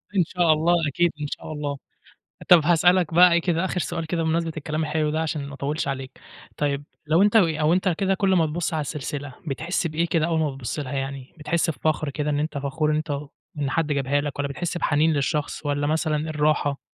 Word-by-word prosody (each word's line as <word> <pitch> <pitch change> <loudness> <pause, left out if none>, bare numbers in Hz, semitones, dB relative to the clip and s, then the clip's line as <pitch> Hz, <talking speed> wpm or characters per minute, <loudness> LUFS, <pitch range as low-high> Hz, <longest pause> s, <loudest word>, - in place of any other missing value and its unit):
إن 180 - +5
شاء 175 -3 +3
الله 165 +3 +2
أكيد 170 +4 +1
إن 145 - -2
شاء 155 - -7
الله. 145 -1 -3 0.7
طب 175 -2 +8
هاسألك 175 0 +3
بقى 180 0 +7
إيه 170 - +4
كده 170 +1 0
آخر 180 -1 -1
سؤال 165 -2 -3
كده 165 +1 -1
بمناسبة 165 0 0
الكلام 155 +1 -2
الحلو 155 -1 0
ده 160 +1 -1
عشان 150 -3 -3
ما 140 - -8
أطوّلش 140 +1 -2
عليك، 135 -1 -5 0.4
طيب 145 -1 -1 0.2
لو 165 +5 +4
أنت 210 +2 +4
و 190 -6 +6
أو 155 0 +1
أنت 185 +1 +2
كده 190 +3 +1
كل 190 -1 +2
ما 165 -3 +3
تبُص 165 +1 -2
على 155 - 0
السلسلة 145 -1 -5
بتحس 170 +6 -2
بإيه 165 +2 0
كده 165 -1 +1
أول 165 -1 0
ما 150 -2 +1
بتبُص 135 +1 -5
لها 140 -2 -4
يعني، 135 -1 -5
بتحس 165 +2 0
بفخر 155 +1 -1
كده 150 +1 -2
إن 145 - 0
أنت 155 -1 -2
فخور 150 +3 -1
إن 150 - +2
أنت 155 0 -3
واخ 140 0 -3 0.3
إن 140 -2 -1
حد 165 +1 +1
جابها 140 +1 +1
لك 145 -1 -5
والّا 140 0 -1
بتحس 175 +4 -3
بحنين 155 +1 +2
للشخص 145 +1 -2
والّا 145 0 0
مثلًا 155 0 +1
الراحة؟ 150 -2 +1
155 Hz, 225 wpm, -24 LUFS, 145-170 Hz, 0.7 s, طب